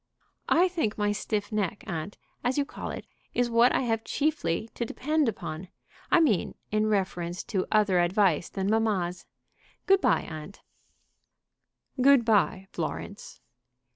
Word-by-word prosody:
"I 350 +3 +5
think 320 - -2
my 205 -1 +1
stiff 205 0 -2
neck, 205 -2 -2
aunt, 170 +2 -5 0.3
as 250 +2 0
you 285 - +2
call - - -7
it, - - -6 0.3
is 245 -1 +1
what 235 +2 +5
I - - +1
have 225 -3 -1
chiefly 285 - -1
to - - -3
depend 300 +3 0
upon, 175 -4 -6 0.4
I - - +5
mean 250 - +2 0.2
in 215 0 +2
reference 185 -4 -1
to 190 -2 0
other 210 -4 +3
advice 175 -1 +2
than 195 -1 -3
mamma's. 200 -5 0 0.6
Good 390 0 +4
bye, - - +3
aunt." 155 +5 -9 1.4
"Good 270 -2 +6
bye, 200 -3 +2
Florence." 200 0 -6
210 Hz, 140 wpm, -28 LUFS, 190-245 Hz, 1.4 s, Good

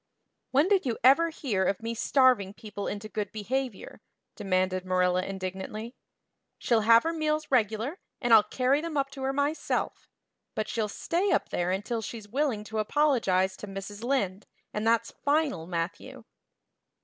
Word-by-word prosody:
"When 285 +6 +3
did 390 -1 +3
you 235 - -1
ever 280 +7 +6
hear 245 -12 -1
of 195 +3 -1
me 230 0 -2
starving 230 -5 +3
people 205 -2 -6
into 205 +1 -4
good 210 -1 -4
behavior?" 240 +1 -4 0.3
demanded 185 -1 0
Marilla 185 0 +2
indignantly. 195 +4 -5 0.6
"She'll 230 -2 +2
have 230 +2 +6
her 330 +1 -1
meals 310 -1 -1
regular, 235 - +1 0.2
and 240 -3 +2
I'll 220 - +10
carry 260 +6 +1
them 325 -2 -4
up 275 0 0
to 275 - -9
her 265 0 0
myself. 285 +3 -2 0.5
But 215 - -1
she'll 220 -2 -1
stay 350 - -1
up - - +1
there 175 0 -1
until 210 +5 -2
she's 220 0 -7
willing 250 -2 -1
to 215 +1 -4
apologize 215 -8 +2
to 210 - -8
Mrs. 200 +2 -7
Lynde, 210 -7 -1 0.3
and 210 +1 -1
that's 230 0 +2
final, 285 - +1
Matthew." 180 +9 -4
225 Hz, 160 wpm, -28 LUFS, 195-270 Hz, 0.6 s, I'll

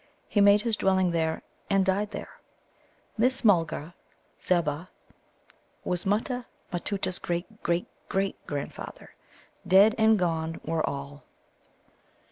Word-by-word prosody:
He 205 - +2
made 205 +1 +6
his 230 0 0
dwelling 190 -3 +2
there, 160 -1 -1 0.3
and 195 -2 +3
died 200 +2 +1
there. - - -8 0.8
This 255 +2 +2
Mulgar, 170 -4 +2 0.5
Zebbah, 170 -1 0 1.0
was 180 +1 -2
Mutta 235 +5 0 0.3
matutta's 185 +1 -1
great 175 +5 -4
great 170 +1 0 0.2
great 195 0 0
grandfather. 145 -1 -6 0.5
Dead 200 +4 +7
and 220 0 +5
gone 165 -3 -1
were 160 0 0
all. 140 0 -7
185 Hz, 110 wpm, -27 LUFS, 165-205 Hz, 1.0 s, Dead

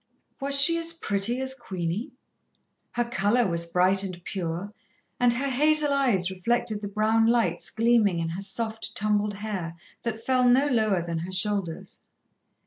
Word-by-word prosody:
Was 275 0 +2
she 335 +4 +6
as 330 0 0
pretty 225 -5 -1
as 265 0 -2
Queenie? 195 - -4 0.8
Her 240 - +1
colour 235 0 +1
was 170 -1 -1
bright 185 +3 +2
and 185 -3 -5
pure, 180 +2 -4 0.5
and 245 -1 +4
her 265 +4 -2
hazel 295 +2 +4
eyes 220 -10 +1
reflected 215 +2 -1
the 205 - -4
brown 215 +2 +2
lights 225 -8 +1
gleaming 225 -5 +2
in 165 -1 -2
her 175 +4 -5
soft, 220 +3 -4
tumbled 210 -1 0
hair, 195 -5 -5 0.3
that 225 -1 -5
fell 255 -1 +3
no 260 +3 +4
lower 215 -9 +1
than 170 -1 -3
her 175 +3 -6
shoulders. 190 -3 -2
215 Hz, 155 wpm, -26 LUFS, 185-245 Hz, 0.8 s, she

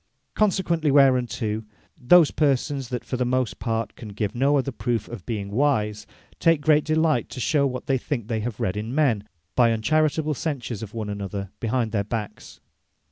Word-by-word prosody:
Consequently 175 -6 +1
whereunto, 125 -5 +3 0.3
those 160 +5 +5
persons, 140 -2 0
that 125 -1 -4
for 130 - -3
the 125 - +1
most 125 -1 -1
part 115 -1 -2
can 110 - -9
give 100 0 -3
no 140 +4 +2
other 135 0 -1
proof 120 -2 -2
of 120 -7 -9
being 100 -4 -3
wise, 105 -4 0 0.3
take 165 -2 +4
great 150 0 +3
delight 155 -5 +1
to - - -7
shew 140 +3 +2
what 125 -1 -5
they 135 -1 +1
think 120 -5 -3
they 115 -1 -1
have 110 0 -4
read 90 - -1
in 110 +5 -4
men, 120 -10 +2 0.3
by 120 -2 +5
uncharitable 155 +6 +1
censures 130 -7 -4
of 110 0 -8
one 110 -2 -3
another 100 -1 -5
behind 115 -1 -1
their 105 -2 0
backs. 105 -1 -6
125 Hz, 180 wpm, -24 LUFS, 110-145 Hz, 0.3 s, those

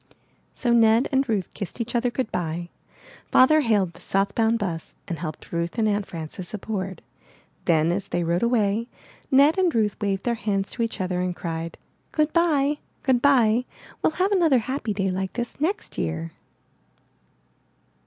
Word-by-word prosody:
So 240 -2 +1
Ned 230 +1 +5
and 270 -1 +1
Ruth 205 -5 -1
kissed 200 +4 -6
each 235 0 -3
other 245 0 +2
good 245 -1 -3
bye. 170 0 -3 0.6
Father 310 +4 +6
hailed 205 - +2
the - - -15
south 195 +1 0
bound 225 0 +2
bus 175 -7 -4
and 170 -5 -4
helped 155 -3 -7
Ruth 170 +4 -2
and 220 -1 +2
Aunt 205 -1 0
Frances 170 +4 -6
aboard. 190 -4 -4 0.6
Then, 160 0 +3
as 195 +2 -2
they 175 -2 -1
rode 170 +1 0
away, 230 -1 +1 0.4
Ned 285 +6 +5
and 360 -6 +2
Ruth 210 -3 +2
waved 195 -2 -1
their 240 - +2
hands 200 -4 -1
to 240 - -5
each 230 -1 -2
other 180 -1 -1
and 180 -1 -2
cried: 165 -1 -5 0.4
''Goodbye! 305 -2 +2 0.2
Goodbye! 250 -3 +4 0.4
WeUl - - +3
have 375 +4 +1
another 335 -9 +4
happy 260 -4 -2
day 195 -2 0
like 190 0 -3
this 240 +3 -5
next 385 +7 -2
year!" 80 0 -2
215 Hz, 165 wpm, -24 LUFS, 180-255 Hz, 0.6 s, Father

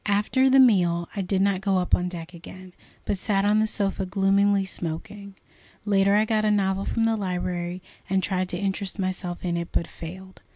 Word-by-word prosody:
After 210 +6 +2
the 270 +1 +5
meal 175 -9 +4
I 200 - -1
did 190 +1 0
not 195 -2 +1
go 195 -1 +1
up 180 -1 -2
on 180 0 +2
deck 170 -1 -8
again, 185 +2 -12 0.3
but 200 - -2
sat 195 -1 0
on 210 +1 +3
the 220 - +2
sofa 200 -2 -1
gloomily 195 +1 +2
smoking. 190 +3 -6 0.5
Later 200 -1 +3
I 215 +1 +3
got 215 -1 0
a 215 - +2
novel 195 -1 +1
from 230 - -1
the 225 0 +2
library, 180 -2 -3 0.3
and 190 0 +1
tried 185 0 -1
to 175 - -4
interest 195 0 -3
myself 185 -2 -4
in 170 -1 -1
it, 170 0 -4
but 170 - 0
failed. 185 +4 -10
195 Hz, 200 wpm, -25 LUFS, 180-205 Hz, 0.5 s, the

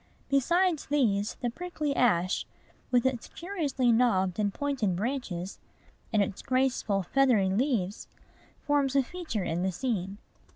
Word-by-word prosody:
Besides 340 +4 +2
these, 220 -8 +1
the 240 -2 -1
prickly 305 -2 -3
ash, 185 -7 +2 0.4
with 245 -1 +2
its 260 -3 -1
curiously 300 -9 -1
knobbed 195 -6 +2
and 205 -1 +1
pointed 255 -8 -1
branches, 200 -5 -3 0.5
and 215 -3 +3
its 195 0 -5
graceful, 255 -6 +1
feathery 230 -2 +3
leaves, 210 -2 -1 0.6
forms 280 -2 +1
a 275 - +5
feature 320 - -4
in 170 +1 -1
the 190 +1 0
scene. 195 -2 -2
245 Hz, 130 wpm, -29 LUFS, 195-275 Hz, 0.6 s, a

